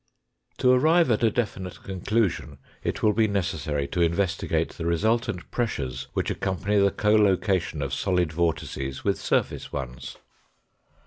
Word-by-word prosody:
To 125 - +4
arrive 155 +3 +4
at 110 - +2
a 115 - +4
definite 100 -5 -3
conclusion 95 -5 -1 0.3
it - - -3
will 105 - +4
be 110 +1 +3
necessary 80 -8 -1
to 85 - -1
investigate 85 -1 +1
the 85 - -5
resultant 110 +2 0
pressures 65 - -2
which - - -1
accompany 100 +2 0
the 100 0 +5
collocation 100 -6 +2
of 70 -1 -4
solid 90 -1 0
vortices 75 -5 -2
with - - 0
surface - - -1
ones. 65 -2 -6
95 Hz, 135 wpm, -26 LUFS, 80-105 Hz, 0.3 s, the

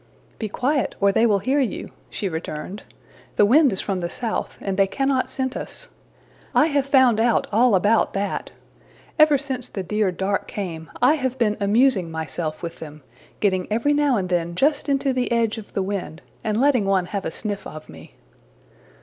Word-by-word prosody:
``Be 215 -3 -4
quiet, 275 +4 0
or 200 0 +4
they 225 +4 +3
will 205 -3 +3
hear 260 +9 +1
you,'' 260 -5 -2 0.2
she 200 - -3
returned. 160 +3 -5 0.6
``The 205 - +6
wind 275 +5 +5
is 190 - -2
from 195 -2 -2
the 170 -1 -3
south, 230 +3 -3
and 195 -1 -3
they 195 0 +3
cannot 270 +5 0
scent 260 -1 -3
us. - - -7 0.7
I 300 - +6
have 280 -1 +1
found 260 -5 +4
out 235 +1 +2
all 230 +1 +4
about 205 +5 +2
that. 200 0 -2 0.7
Ever 305 -2 +6
since 260 -3 -4
the 195 - -5
dear 210 0 0
dark 190 +3 -2
came, 165 -6 -5
I 260 +4 +6
have 260 -2 -2
been 215 -4 +1
amusing 205 -2 +3
myself 160 0 -4
with 170 0 -6
them, 150 -2 -10 0.4
getting 185 -3 +1
every 235 +7 +2
now 290 -4 +2
and 185 -2 -1
then 170 -1 -1
just 290 - +1
into 275 -1 +1
the 250 -1 -1
edge 230 -1 +1
of 215 - -12
the 195 - 0
wind, 185 -4 -5 0.2
and 215 -1 0
letting 260 -6 +3
one 195 -2 +2
have 195 +1 -4
a - - -2
sniff 205 +4 -4
of 155 0 -10
me.'' - - -14
210 Hz, 190 wpm, -23 LUFS, 185-260 Hz, 0.7 s, ``The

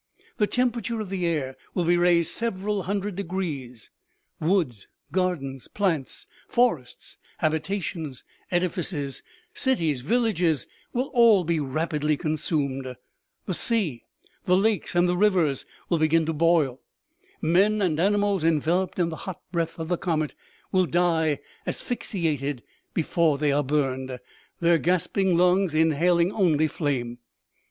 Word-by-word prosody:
The 210 - +2
temperature 235 -1 0
of 205 -3 -5
the 180 -3 -1
air 140 -6 -1 0.2
will 180 - +1
be 175 +1 +4
raised 175 -1 +3
several 210 -3 -1
hundred 200 +1 -2
de - - -1
grees; 150 - -5 0.5
woods, 155 - 0 0.2
gardens, 155 -8 -2
plants, 170 -10 -2 0.2
forests, 200 - 0 0.2
habitations, 160 -3 -2 0.3
edifices, 175 -5 -2 0.3
cities, 165 - +1
villages, 180 - +1 0.3
will 255 +3 -2
all 230 -6 +6
be 165 -1 0
rapidly 150 +1 -1
consumed; 140 -5 -2 0.5
the 185 - -2
sea, 175 - 0 0.4
the 180 -1 +4
lakes 210 -2 0
and 175 +1 +4
the 180 - +1
rivers 180 -8 +2 0.2
will 170 - +1
begin 160 +1 +3
to 160 - -1
boil; 155 -5 +2 0.6
men 195 +6 +3
and 170 -6 +1
animals, 205 -1 +2
enveloped 165 +3 +1
in 175 -2 +1
the 160 - -6
hot 185 - -6
breath 165 -2 -2
of 160 -1 -4
the 175 0 -1
comet, 155 -5 -1 0.4
will 185 -1 +3
die 160 -2 +2 0.3
asphyx 245 - -3
iated 145 -7 -1 0.3
before 160 -2 +2
they 145 0 +1
are 145 +1 +2
burned, 130 -2 -1 0.4
their 170 -1 +4
gasping 180 +1 +1
lungs 180 -1 +3
inhaling 170 +3 +3
only 160 -7 +2
flame. 125 -6 -2
170 Hz, 130 wpm, -25 LUFS, 150-190 Hz, 0.6 s, all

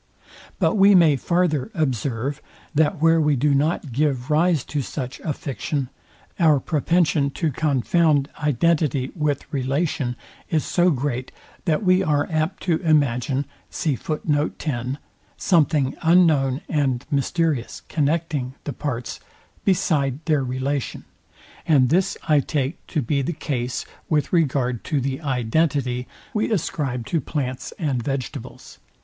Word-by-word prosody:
But 220 - +2
we 200 0 +7
may 165 -5 +6
farther 170 - 0
observe, 135 - -1 0.3
that 155 +3 +2
where 165 0 +5
we 150 -1 +3
do 145 +3 +2
not 150 0 0
give 135 0 0
rise 160 -1 +3
to 150 - -3
such 130 -1 -5
a 160 - -3
fiction, 140 -1 -3 0.5
our 155 -5 +5
propension 155 -1 +1
to 160 -3 0
confound 145 +1 +2
identity 150 -2 +1
with 150 -4 -1
relation 135 -1 -1 0.3
is 155 -3 +1
so 180 0 +3
great, 130 -4 -2 0.3
that 165 +3 +1
we 185 0 +4
are 145 -4 +1
apt 155 +2 -1
to 170 -3 +2
imagine 140 -4 +1 0.2
something 155 +1 -2 1.8
unknown 155 -6 +4
and 135 -5 0
mysterious, 145 -2 0
connecting 150 -4 -1
the 145 - -4
parts, 130 -5 -4 0.4
beside 155 -9 +1
their 155 -4 +2
relation; 130 +2 -3 0.6
and 135 -6 +4
this 185 +4 +2
I 150 -2 +5
take 140 +1 -2
to 150 -5 -1
be 140 +4 0
the 155 +6 -2
case 125 -5 -3 0.2
with 150 -1 0
regard 130 -7 +1
to 150 - 0
the 135 +2 -2
identity 130 -1 0 0.3
we 215 +1 0
ascribe 140 - -1
to 165 +4 0
plants 130 -2 -4
and 140 -7 -1
vegetables. 135 0 -6
145 Hz, 125 wpm, -23 LUFS, 130-160 Hz, 1.8 s, we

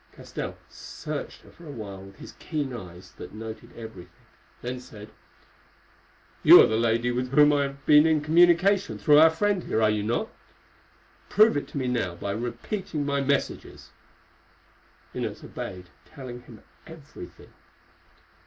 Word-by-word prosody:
Castell - - -7
searched - - -8
her - - -17
for 170 - -15
a - - -7
while 100 -7 -8
with 95 +1 -13
his - - -11
keen 145 -6 -4
eyes 90 -6 -10
that - - -10
noted 110 0 -8
everything, 110 -6 -10 0.5
then 125 +1 -4
said: 105 -4 -13 1.3
"You - - +10
are - - +8
the 110 - -1
lady 115 +1 +1
with 125 +1 -2
whom 150 +2 +5
I 145 - +2
have 140 0 -9
been 150 +1 +6
in 160 -1 +3
communication 175 +5 +3
through 150 -2 +5
our 160 +1 +8
friend 195 +3 0
here, - - -1
are 110 -1 +3
you 105 -1 -1
not? 110 +3 -2 1.0
Prove 215 +3 +5
it 145 - -2
to - - -8
me 130 -2 -2
now 115 -8 -2
by 100 +3 -5
repeating 145 - -4
my 140 -1 0
messages." 140 0 -3 1.2
Inez - - -5
obeyed, 90 -1 -8 0.2
telling 125 -4 -9
him 115 -3 -15 0.2
everything. 160 -3 -13
125 Hz, 155 wpm, -26 LUFS, 110-155 Hz, 1.3 s, You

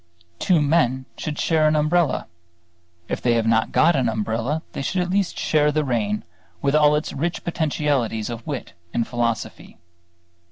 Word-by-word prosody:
Two 170 -5 +3
men 130 -4 +2
should 150 -1 -5
share 160 -2 +2
an 155 - +2
umbrella; 155 0 +2 0.8
if - - -3
they 120 -1 +2
have 115 -1 +1
not 115 0 +2
got 170 +1 +4
an 130 -4 +2
umbrella, 115 +7 -2
they - - -5
should 185 +7 -1
at 180 - -4
least 195 -1 0
share 150 -1 +2
the 155 +1 +1
rain, 105 -5 -1 0.4
with 140 - 0
all 150 -1 +5
its 150 - -2
rich 170 +5 -2
potentialities 140 -9 -1
of 115 -1 -8
wit 140 -5 -5 0.2
and 115 - +1
philosophy. 120 -2 -3
145 Hz, 165 wpm, -22 LUFS, 115-155 Hz, 0.8 s, all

